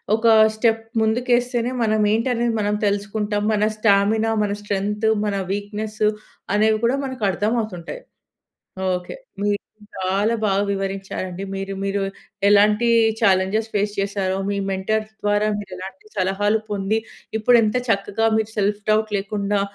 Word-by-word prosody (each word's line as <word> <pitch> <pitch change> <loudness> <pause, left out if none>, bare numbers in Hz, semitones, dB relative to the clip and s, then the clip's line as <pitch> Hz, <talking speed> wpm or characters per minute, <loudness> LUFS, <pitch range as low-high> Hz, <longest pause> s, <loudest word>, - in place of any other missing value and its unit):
ఒక 225 +1 -4 0.3
స్టెప్ 225 0 +1 0.2
ముందుకేస్తేనే 245 +1 +1
మనం 215 -1 +2
ఏంటనేది 235 +1 +1
మనం 205 0 0
తెలుసుకుంటాం. 205 +1 -1
మన 210 0 +1
స్టామినా, 215 +1 +3
మన 205 - -1
స్ట్రెంత్, 205 +1 -1 0.2
మన 205 -1 -1 0.2
వీక్నెస్, 210 +1 -4 0.5
అనేవి 215 +1 +3
కూడా 250 +4 +2
మనకు 260 -4 -6
అర్థం 205 +5 0
అవుతుంటాయి. 180 - -7 0.9
ఓకె. 180 - -5 0.3
మీరు 205 0 +2 0.4
చాలా 195 +4 +1
బాగా 200 -1 +2
వివరించారండి. 195 -1 -4
మీరు 195 0 -4
మీరు 200 0 -1 0.5
ఎలాంటి 210 +3 +4 0.3
ఛాలెంజెస్ 200 +1 +2
ఫేస్ 205 0 +1
చేశారో, 195 -1 -1
మీ 200 - -1
మెంటర్స్ 215 +3 -1
ద్వారా 205 +1 +2
మీరు 200 -2 -8
ఎలాంటి 190 +2 -9
సలహాలు 200 +3 +1
పొంది, 205 +2 0 0.4
ఇప్పుడు 240 +3 +5
ఎంత 215 +2 +1
చక్కగా 205 +1 +1
మీరు 220 0 -2
సెల్ఫ్‌‌డౌట్ 210 +1 +1
లేకుండా, 200 0 -1
205 Hz, 130 wpm, -22 LUFS, 195-220 Hz, 0.9 s, ఇప్పుడు